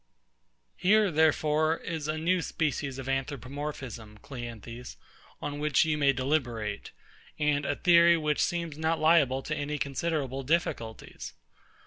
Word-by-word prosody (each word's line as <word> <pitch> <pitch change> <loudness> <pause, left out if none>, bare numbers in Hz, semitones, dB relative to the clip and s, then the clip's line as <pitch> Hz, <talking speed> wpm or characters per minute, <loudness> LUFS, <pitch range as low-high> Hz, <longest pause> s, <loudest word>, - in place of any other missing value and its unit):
Here, 205 +1 +4
therefore, 155 0 +3
is 160 -4 -5
a 155 0 -1
new 175 +3 +1
species 145 -5 -2
of 135 -1 -7
Anthropomorphism, 135 -4 -4
CLEANTHES, 120 -2 -8 0.5
on 145 0 -4
which 150 -2 +3
you 155 -1 +1
may 140 -2 +4
deliberate; 125 -6 -2 0.5
and 150 -1 +1
a - - 0
theory 170 -1 +6
which 150 -2 0
seems 170 -3 -1
not 160 +1 +1
liable 150 -5 +4
to 150 - -3
any 145 0 -3
considerable 140 -1 -2
difficulties. 130 -7 -2
150 Hz, 125 wpm, -29 LUFS, 130-160 Hz, 0.5 s, theory